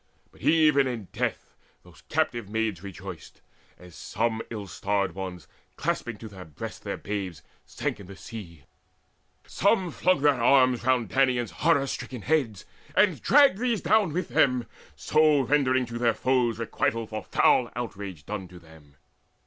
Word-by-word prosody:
But - - -21
even 150 -4 +4
in 115 -7 -5
death - - -3 0.3
those - - -18
captive 115 -4 -1
maids 110 -5 -1
rejoiced, 95 -2 -9 0.4
As 90 -1 -15
some 110 +5 -2
ill 105 -3 -6
starred 100 +1 -1
ones, 90 -3 -7 0.3
clasping 120 -3 -2
to 110 - -9
their 95 -3 -10
breasts 80 -5 -8
Their - - -5
babes, 95 -7 -5 0.2
sank - - -3
in 100 - -11
the 100 - -10
sea; 90 - -10 0.8
some 190 -3 +1
flung 185 -4 +1
their 145 -4 +3
arms 130 -1 +4
Round 125 -2 +2
Danaans' 125 0 +1
horror 140 - +2
stricken 125 -4 -6
heads, 135 -10 0 0.3
and 190 -6 +3
dragged 280 -8 +5
These 240 -3 0
down 210 -6 +3
with 175 +2 -3
them, 125 -3 +2 0.3
so 155 -2 +3
rendering 130 -1 +2
to 120 0 -6
their 120 -1 +2
foes 125 -4 +1
Requital 115 0 -1
for 110 0 -6
foul - - +3
outrage 95 -7 -6
down 95 -1 -5
to 90 - -14
them. 80 -4 -18
115 Hz, 155 wpm, -26 LUFS, 95-140 Hz, 0.8 s, dragged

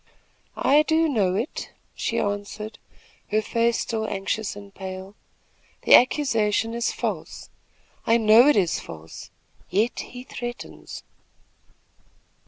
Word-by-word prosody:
"I 290 +2 +5
do 320 +1 +2
know 200 -10 +1
it," 225 +9 -3 0.2
she - - -2
answered, 205 +2 -3 0.5
her 215 - +2
face 230 +1 +1
still 220 -1 -2
anxious 200 +2 -2
and 200 -1 -12
pale. 190 0 -7 0.7
"The - - +5
accusation 230 -5 +4
is 235 0 0
false. - - -5 0.6
I 230 - +5
know 225 +3 +6
it 295 - +5
is 185 -5 +1
false; 80 +1 -10 0.4
yet 210 +7 0
he 250 0 -8
threatens." 240 -1 -8
220 Hz, 115 wpm, -24 LUFS, 200-240 Hz, 0.7 s, know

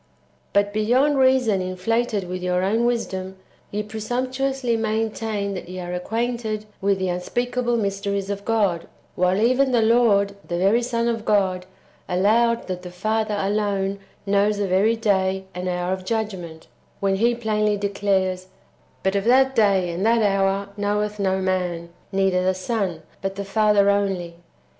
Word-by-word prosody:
6. - - -38 0.5
But, 205 0 +2
beyond 255 +7 +2
reason 260 -7 +3
inflated 200 +3 -1
[with 180 0 -4
your 180 0 0
own 220 +5 +1
wisdom], 190 -6 -2 0.3
ye 210 +1 -3
presumptuously 250 +3 -2
maintain 220 -2 -2
that 180 -2 -7
ye 185 0 -6
are 175 0 -5
acquainted 220 +2 -2 0.2
with 200 0 +2
the 190 -1 -1
unspeakable 240 +7 -1
mysteries 200 -1 -2
of 200 0 -4
God; 200 -7 0 0.3
while 180 +2 +1
even 255 +4 +3
the 235 -3 +3
Lord, 215 -4 +3
the 175 - -2
very 200 +6 +3
Son 235 -1 -1
of 225 -2 -1
God, 190 -4 +1 0.4
allowed 225 +6 +2
that 180 -1 -4
the 180 - -8
Father 215 +4 -1
alone 200 -1 -1 0.3
knows 200 +1 +2
the 205 -1 -1
very 195 +5 +3
day 190 -4 +1
and 180 +1 -3
hour 180 +1 -1
of 190 0 -5
judgment, 185 -7 -4 0.3
when 195 -1 +1
He 235 +3 +2
plainly 215 -2 0
declares, 195 -2 0 0.3
" - - -36
But 190 +1 +1
of 200 +1 0
that 265 +2 +4
day 195 -5 +3
and 175 +3 -3
that 230 0 +3
hour 195 0 +1
knoweth 210 +1 -1
no 190 -1 +1
man, 180 -3 -1 0.2
neither 190 -1 +2
the 185 0 +1
Son, 185 -4 -2 0.2
but 195 0 -3
the 200 0 -5
Father 210 0 +3
only."' 190 -4 -1
200 Hz, 160 wpm, -23 LUFS, 190-225 Hz, 0.5 s, that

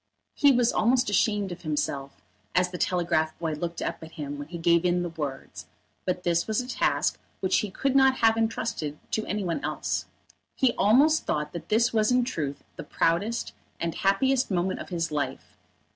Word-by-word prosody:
He 285 - +5
was 245 -2 +3
almost 245 +1 +2
ashamed 205 -1 +1
of 175 - -7
himself 140 -3 -3 0.3
as 180 0 +3
the 180 - -6
telegraph 165 -3 0
boy 165 -2 -2
looked 170 +2 -4
up - - -4
at 160 0 -11
him 145 -2 -6
when 145 - -6
he 170 +1 -6
gave 170 0 +3
in 175 0 +2
the 175 - -3
words, 150 -5 -6 0.4
but 180 -1 -1
this 170 -1 +1
was 220 -1 0
a 250 - -4
task 255 - 0 0.2
which 190 0 +2
he 210 - -2
could 270 +8 -1
not 265 -1 +6
have 225 -3 +4
entrusted 225 -9 -2
to 220 - 0
any 210 -1 -2
one 175 +8 -2
else. - - -2 0.5
He 260 -3 +3
almost 285 +10 +4
thought 150 0 -1
that 170 -1 -7
this 230 +2 +3
was 215 +1 +3
in 250 0 +4
truth 150 - -4
the - - -6
proudest 200 +8 0 0.3
and 170 -1 -2
happiest 260 +7 +2
moment 185 -1 0
of - - -8
his 170 -3 -2
life. 150 -1 -4
180 Hz, 190 wpm, -27 LUFS, 165-225 Hz, 0.5 s, not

